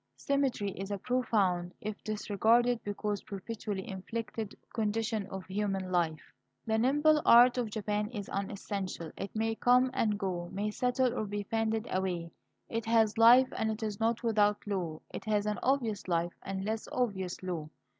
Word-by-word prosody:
Symmetry 270 -8 0
is 195 +1 -6
a 200 - -2
profound, 195 -7 0
if 210 0 -6
disregarded 225 +3 +2
because 205 0 -2
perpetually 205 -1 -5
inflected, 220 +2 -5 0.2
condition 220 -1 -1
of 190 -1 -7
human 195 -1 -2
life. 165 -4 -1 0.3
The 220 0 +1
nimble 295 +5 +4
art 245 +2 +7
of 235 -3 -1
Japan 210 0 -2
is 210 -5 -6
unessential; 195 -4 -4
it 195 - -6
may 225 +1 +1
come 250 +3 +4
and 210 -5 +1
go, 180 -4 -3
may 205 +2 -2
settle 250 +2 +1
or 215 - -2
be 205 0 -3
fanned 225 +1 -1
away. 180 -3 -1 0.4
It 230 -1 -3
has 225 -1 +3
life 245 +3 +8
and 220 - 0
it 220 +1 -3
is 210 -2 -3
not 225 +1 +1
without 210 -2 +2
law; 180 -6 -3
it - - -6
has 210 -1 +1
an 210 0 -1
obvious 240 -8 0
life, 170 0 0
and 190 0 -4
a 215 - -1
less 220 0 -4
obvious 190 -8 -2
law. 170 -4 -4
210 Hz, 165 wpm, -31 LUFS, 195-230 Hz, 0.4 s, life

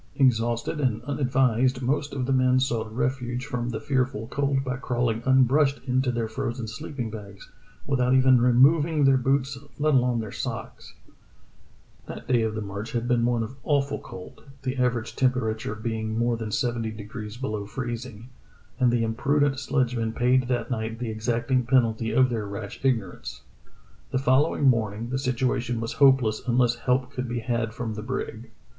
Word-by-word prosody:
Exhausted 120 +1 +1
and 120 -5 0
unadvised, 130 -2 +1
most 140 +3 0
of 130 -2 -2
the 135 - 0
men 130 0 +3
sought 115 -4 -1
ref 130 +3 -1
uge 125 0 -4
from 125 -4 -3
the 110 -2 -3
fearful 130 -5 -1
cold 140 -1 0
by 130 -2 -2
crawling 120 -3 -1
unbrushed 135 +2 +4
into 130 0 +1
their 120 -2 -2
frozen 115 +1 -4
sleeping 115 +2 -5
bags, 100 -2 -10 0.3
without 130 -2 +2
even 130 -1 +5
removing 145 +5 +4
their 135 -1 +6
boots 135 +1 0 0.2
let 150 +1 +2
alone 125 -2 +3
their 110 -3 -5
socks. - - -6 1.1
That - - -8
day 125 -2 +3
of 110 -1 -1
the 110 - -3
march 100 +3 -6
had 120 0 -1
been 120 -2 +2
one 120 -1 +1
of 125 +4 -8
awful 140 -1 0
cold, 90 - -11 0.2
the 130 0 -2
average 125 -3 0
temperature 110 -5 0
being 110 0 -3
more 120 0 +1
than 115 -2 -5
seventy 115 +1 -1
degrees 105 +1 -8
below 110 -6 -4
freezing, 120 0 -6 0.5
and 125 -2 +4
the 120 -1 +1
im 110 0 -1
prudent 140 +2 +1
sledgemen 120 -4 0
paid 125 +2 +2
that 125 +1 -1
night 110 -1 -3
the 115 -1 -4
exacting 120 +3 0
penalty 115 -3 +2
of 130 +1 +3
their 110 -3 -2
rash 100 0 -7
ignorance. 100 - -2 0.7
The - - -1
following 135 +4 +2
morning 115 -1 +1
the 130 - -1
situation 125 -2 -1
was 115 0 -3
hopeless 130 -6 +5
unless 120 0 +3
help 125 +2 0
could 130 -3 -4
be 120 0 -2
had 115 -2 -1
from 115 -2 -3
the 105 - -5
brig. 115 -1 -5
125 Hz, 170 wpm, -26 LUFS, 115-130 Hz, 1.1 s, their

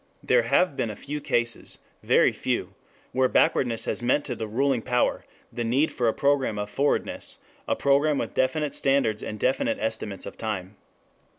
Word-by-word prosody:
There - - +4
have 180 - +2
been 115 - -1
a 105 - -5
few 150 +5 -6
cases, 120 -3 -1 0.2
very - - +4
few, - - -2 0.4
where 130 0 +3
backwardness 115 -3 +2
has - - -2
meant 125 +4 +1
to 125 - -3
the 110 -1 -4
ruling 130 +3 +1
power 125 +1 0 0.3
the 120 - -2
need 130 +7 +2
for 120 - 0
a - - +4
program 140 -6 +1
of 105 0 -4
forwardness, 140 +1 -1 0.3
a - - +1
program 140 +1 +2
with - - -3
definite 145 +3 0
standards 135 -6 +1
and 105 - -6
definite 130 +5 +1
estimates 110 -3 -3
of - - -9
time. 105 -3 -4
125 Hz, 175 wpm, -26 LUFS, 110-140 Hz, 0.4 s, There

